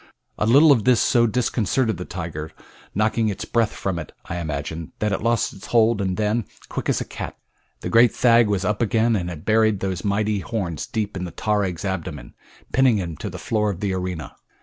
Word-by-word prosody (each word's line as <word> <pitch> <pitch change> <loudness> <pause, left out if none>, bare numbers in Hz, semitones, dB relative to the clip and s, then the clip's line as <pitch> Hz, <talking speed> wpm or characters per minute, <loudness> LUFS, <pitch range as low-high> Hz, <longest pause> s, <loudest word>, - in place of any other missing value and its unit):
A 105 - +1
little 145 +6 +7
of 120 -7 +4
this 125 0 +4
so 120 -2 +4
disconcerted 115 -1 0
the 90 - -6
tiger, 80 -3 -6 0.4
knocking 110 +2 +2
its 100 -1 -4
breath 115 -2 +1
from 95 -3 -3
it 80 - -8
I 85 - -4
imagine, 80 0 -4
that 105 -1 0
it 95 - -1
lost 115 0 +1
its 95 - -11
hold 115 -2 +3
and 95 -2 -1
then, 110 +1 0 0.2
quick - - -3
as - - +1
a - - -3
cat, - - -7 0.4
the - - -3
great 115 +1 +6
thag 120 -2 +5
was 100 -2 0
up 105 +3 0
again 115 0 +2
and 90 -3 -2
had 80 -3 -8
buried 110 -2 +3
those 95 -2 -3
mighty 105 0 0
horns 95 -8 -3
deep 105 -2 -3
in 90 -1 -3
the 85 - -7
tarag's 100 -2 -1
abdomen, 95 -10 -4 0.4
pinning 130 -3 +4
him 85 -5 -3
to - - -5
the - - -7
floor 105 -2 0
of 95 -3 -4
the 100 -1 -1
arena. 90 -3 -4
105 Hz, 210 wpm, -23 LUFS, 90-115 Hz, 0.4 s, little